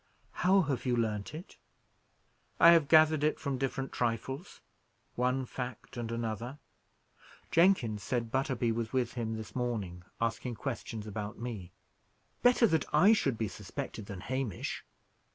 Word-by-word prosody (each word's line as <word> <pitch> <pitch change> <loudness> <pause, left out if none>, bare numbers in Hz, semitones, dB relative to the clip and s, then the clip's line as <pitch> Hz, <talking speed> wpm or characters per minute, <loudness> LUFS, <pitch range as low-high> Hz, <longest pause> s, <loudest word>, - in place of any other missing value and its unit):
"How 190 +2 +4
have 140 -5 -2
you 120 -1 +2
learnt 110 +2 -1
it?" 170 +4 -10 1.0
"I 170 - +9
have 165 -4 +5
gathered 155 -1 +6
it 155 - +2
from 140 -4 -2
different 135 0 -2
trifles; 125 - -3 0.5
one 125 +1 0
fact 125 0 -6
and 120 -1 -4
another. 115 +3 -3 0.9
Jenkins 160 - +3
said 115 +2 -2
Butterby 130 -3 +1
was 115 0 -2
with 125 -3 0
him 115 -2 -2
this 110 -1 -8
morning, 110 -8 -2 0.2
asking 115 +1 -1
questions 115 -4 -5
about 105 0 -5
me. 110 -7 -6 0.7
Better 245 -1 +5
that 160 -9 +2
I 185 +9 +6
should 135 - +1
be 110 - -1
suspected 105 +2 -6
than 95 -3 -7
Hamish. 130 -3 -3
125 Hz, 140 wpm, -31 LUFS, 110-140 Hz, 1.0 s, I